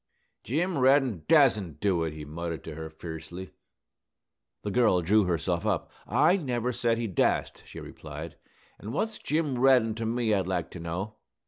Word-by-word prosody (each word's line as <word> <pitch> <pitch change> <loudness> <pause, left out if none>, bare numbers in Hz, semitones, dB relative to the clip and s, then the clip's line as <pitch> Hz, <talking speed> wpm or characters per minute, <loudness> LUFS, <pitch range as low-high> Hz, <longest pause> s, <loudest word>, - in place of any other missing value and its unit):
"Jim 165 - 0
Reddin 130 - +3
dasn't 105 - +4
do 90 -3 +1
it," 80 - -2
he 75 -1 -8
muttered 85 +2 -5
to 80 - -7
her, 80 +1 -6
fiercely. 85 +3 -8 1.1
The 105 - -2
girl 105 -6 +3
drew 105 +4 +4
herself 85 +1 -1
up. 105 -5 -1 0.2
"I 150 - +4
never 125 - -1
said 115 -1 0
he 115 - -2
dast," 95 -6 0
she - - -9
replied. - - -8 0.4
"An' 110 +3 -7
what's 220 0 -2
Jim 150 -5 -1
Reddin 125 -4 +5
to 115 0 -3
me, 115 -1 +1
I'd 95 -3 +1
like 95 - -2
to 90 - -8
know?" 90 +6 -4
105 Hz, 165 wpm, -28 LUFS, 85-125 Hz, 1.1 s, Reddin